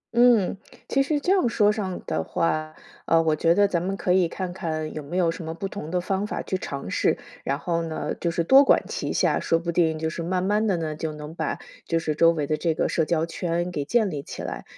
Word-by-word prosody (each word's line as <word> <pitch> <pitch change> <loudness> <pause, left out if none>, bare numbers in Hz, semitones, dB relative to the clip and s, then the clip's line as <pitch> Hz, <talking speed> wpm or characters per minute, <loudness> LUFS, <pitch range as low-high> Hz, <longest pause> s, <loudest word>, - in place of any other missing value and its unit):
嗯， 235 -6 +5 0.3
其 275 - +2
实 295 +2 +1
这 355 +6 0
样 365 -11 +3
说 210 -2 +3
上 190 -4 -3
的 80 - -1
话。 155 - -1 0.3
呃， 165 0 +4
我 155 -1 +2
觉 165 +2 +3
得 205 0 +5
咱 170 -3 -1
们 195 +1 -2
可 180 - +1
以 185 -2 +4
看 185 -2 -4
看 155 -4 -3
有 155 - -5
没 175 +6 -4
有 170 -2 +3
什 165 - -7
么 160 +1 -4
不 195 +3 -4
同 185 -5 -7
的 180 - +1
方 190 +2 -1
法 - - -3
去 190 - -3
尝 140 - -6
试， - - +1 0.3
然 140 +1 -1
后 170 -1 -1
呢 160 -1 -3
就 170 - -2
是 170 0 0
多 270 +6 +8
管 - - +4
齐 - - -3
下， - - +2
说 165 - +2
不 170 0 -3
定 160 -2 +2
就 160 0 -1
是 170 - -5
慢 180 +1 0
慢 210 +3 +1
地 190 -4 +1
呢， 155 -2 -3
就 160 0 -3
能 150 +1 -8
把 160 -3 -2 0.3
就 165 - 0
是 155 -2 -1
周 165 +2 +5
围 150 -3 -2
的 155 - +1
这 165 -2 0
个 - - +1
社 165 - +1
交 165 -1 +1
圈 175 +1 -2
给 145 -4 -2
建 220 +1 +2
立 145 -2 -4
起 - - -8
来。 - - -5
170 Hz, 275 characters per minute, -25 LUFS, 160-195 Hz, 0.3 s, 多